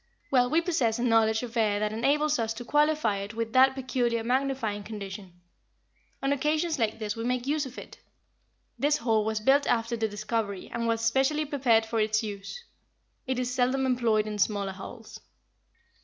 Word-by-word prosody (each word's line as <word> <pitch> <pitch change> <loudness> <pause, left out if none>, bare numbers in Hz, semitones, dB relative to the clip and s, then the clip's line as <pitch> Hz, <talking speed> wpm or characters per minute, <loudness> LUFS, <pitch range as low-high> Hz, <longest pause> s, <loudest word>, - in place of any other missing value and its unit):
Well, 250 -2 +4
we 325 +5 +3
possess 275 -11 0
a 240 - -2
knowledge 225 -1 +3
of 240 -1 -7
air 210 -3 +2
that 210 0 -1
enables 295 +6 +1
us 225 -1 -1
to 245 - -7
qualify 295 -7 +2
it 200 +2 -6
with 230 0 -3
that 265 +1 +5
peculiar 245 -3 -1
magnifying 250 -4 -1
condition. 195 -3 -8 0.8
On 275 +1 +2
occasions 305 +2 0
like 220 -1 0
this 215 -2 -3
we 225 - -5
make 250 +1 -1
use 290 0 0
of 255 - -12
it. - - -10 0.8
This 290 +3 +2
hall 225 -4 +1
was 220 0 -1
built 270 +6 +3
after 230 0 +1
the 225 -1 0
discovery, 210 -1 -3
and 235 -1 -2
was 230 0 0
specially 270 +6 +2
prepared 255 -6 +2
for 225 0 -2
its 215 +1 +1
use. 205 - -7 0.6
It 260 -1 -1
is 250 0 -2
seldom 255 +1 +1
employed 235 -4 +2
in 210 -1 -5
smaller 200 -1 0
halls." 215 +4 -10
230 Hz, 180 wpm, -27 LUFS, 215-265 Hz, 0.8 s, that